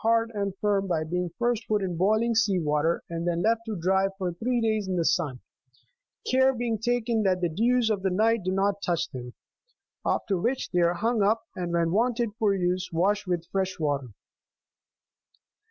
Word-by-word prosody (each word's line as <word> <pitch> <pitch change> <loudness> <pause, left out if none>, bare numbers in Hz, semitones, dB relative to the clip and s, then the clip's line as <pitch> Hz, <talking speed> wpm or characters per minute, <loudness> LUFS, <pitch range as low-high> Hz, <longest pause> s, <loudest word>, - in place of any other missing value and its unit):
hard 230 0 +2
and 200 -1 -1
firm 200 -2 +1
by 165 -4 0
being 180 +2 -2
first 240 -1 0
put 210 -2 +1
in 180 -2 -2
boiling 220 +6 +2
27 - - -4
sea 215 -3 +3
water, 150 +1 0
and 170 +1 -3
then 170 -1 0
left 225 +1 +2
to 220 - -3
dry 190 +3 +2
for 185 -3 -2
three 240 +7 -1
days 215 -3 0
in 185 - -1
the 170 -2 0
sun, 160 -8 0 0.9
care 260 +1 +3
being 230 -2 -2
taken 235 0 0
that 190 -3 +2
the 175 - +1
dews 230 +7 +2
of 205 -3 -1
the 190 - +1
night 220 +4 +2
do 185 - -1
not 195 +1 0
touch 175 -4 0
them; 125 -1 -7 0.7
after 195 -3 0
which 245 +8 -1
they 180 - +1
are 170 0 +3
hung 225 +4 0
up, 220 +3 +2
and 175 -1 -3
when 170 -1 +1
wanted 235 +2 +1
for 205 -3 +3
use, 180 0 -1
washed 195 +4 +1
with 175 -2 -1
fresh 190 -1 -1
water. 145 -4 -1
195 Hz, 195 wpm, -27 LUFS, 175-225 Hz, 0.9 s, sea